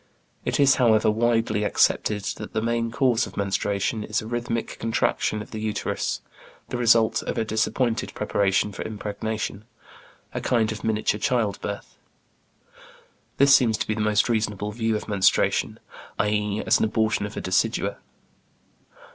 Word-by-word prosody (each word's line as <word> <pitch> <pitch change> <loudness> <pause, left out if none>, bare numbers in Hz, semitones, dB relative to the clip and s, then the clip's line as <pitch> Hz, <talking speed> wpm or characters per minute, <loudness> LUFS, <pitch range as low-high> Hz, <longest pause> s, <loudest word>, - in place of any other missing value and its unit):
It - - -1
is, 140 -1 +5
however, 110 -4 +4
widely 115 -1 +1
accepted 105 0 +2
that - - -8
the 110 - 0
main 115 0 0
cause 125 -1 +1
of - - -13
menstruation 100 +2 -1
is 110 +2 -1
a 110 - -7
rhythmic 115 0 -3
contraction 110 -1 0
of - - -17
the 110 - -5
uterus, 110 -1 -2 0.5
the - - -3
result 115 -2 +4
of - - -4
a 110 - 0
disappointed 110 +2 0
preparation 100 +1 +1
for 100 - -7
impregnation, 105 0 -4 0.7
a - - -3
kind 110 -3 +1
of 110 - -7
miniature 110 -1 0
childbirth. 105 -4 -2 1.4
This 140 0 +7
seems 115 -4 +3
to - - -2
be 110 - 0
the 110 - -3
most 105 0 +2
reasonable 105 -3 -1
view 115 0 -1
of 105 - -4
menstruation; 100 -3 +2 0.4
i.e., 105 0 0
as - - +4
an - - +2
abortion 110 -1 0
of 105 - -11
a - - -2
decidua. 95 0 0
110 Hz, 150 wpm, -24 LUFS, 105-115 Hz, 1.4 s, This